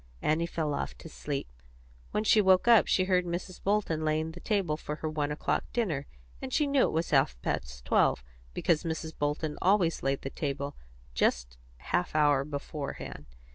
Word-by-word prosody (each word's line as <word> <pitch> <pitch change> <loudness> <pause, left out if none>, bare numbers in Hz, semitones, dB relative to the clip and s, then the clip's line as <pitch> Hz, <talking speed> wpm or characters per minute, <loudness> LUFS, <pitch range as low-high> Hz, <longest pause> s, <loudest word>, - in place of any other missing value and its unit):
Annie 160 +2 +1
fell 155 -3 -2
off - - -3
to - - -10
sleep. 145 -3 -4 0.6
When 210 - -1
she 215 0 +5
woke 190 +1 +4
up 230 -3 +7
she 185 - +3
heard 185 -1 +2
Mrs. 175 +1 -5
Bolton 195 -6 0
laying 155 +1 0
the 175 - -10
table 195 -7 0
for 150 -1 -5
her 155 - -4
one 150 -1 -1
o'clock 150 - -1
dinner, 165 - -1 0.3
and 130 - -5
she 300 - +2
knew 280 -2 +3
it - - -3
was 165 +2 -1
half 135 - +3
past 60 -1 -3
twelve, - - +3 0.3
because 160 -3 +2
Mrs. 160 -1 -4
Bolton 150 +1 -2
always 185 -3 +3
laid 135 0 -1
the 135 - -4
table 140 -1 -3 0.4
just - - 0 0.2
half 90 - -2
an 155 - +4
hour 145 -2 +4
beforehand. 140 - -6
155 Hz, 180 wpm, -29 LUFS, 145-180 Hz, 0.6 s, up